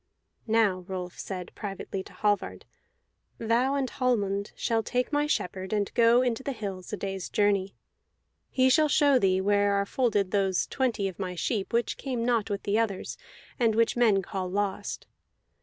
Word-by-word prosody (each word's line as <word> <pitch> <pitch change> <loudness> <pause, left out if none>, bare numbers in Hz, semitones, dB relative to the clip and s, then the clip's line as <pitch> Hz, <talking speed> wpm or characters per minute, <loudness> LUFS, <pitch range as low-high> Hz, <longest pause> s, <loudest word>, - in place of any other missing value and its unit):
"Now," 220 -4 +3
Rolf 180 -1 -6
said 185 -2 -6
privately 195 -1 -5
to - - -13
Hallvard, 205 -1 -1 0.7
"thou 240 +4 +1
and 275 -2 0
Hallmund 205 -7 0
shall 225 -1 0
take 250 +5 -2
my 295 0 +2
shepherd 190 -7 -2
and 205 -1 -1
go 235 +1 +5
into 245 -1 -1
the 275 +1 -3
hills, 195 -5 -6
a 210 - -3
day's 195 -1 -4
journey; 200 -2 +1 0.7
he 260 -1 +3
shall 300 +4 +4
show 285 -3 +4
thee 190 -3 +2
where 205 0 +2
are 200 0 +1
folded 205 -5 0
those 195 -3 +1
twenty 240 -7 -1
of 190 - -7
my 185 -2 -3
sheep 195 +3 -2
which 235 0 0
came 250 -4 -3
not 230 -3 +1
with 200 -1 -3
the 205 +2 +1
others, 205 -4 -2 0.4
and 225 -3 +3
which 230 0 +2
men 220 -5 +3
call 185 0 -4
lost. 200 +1 -2
205 Hz, 170 wpm, -28 LUFS, 195-240 Hz, 0.7 s, go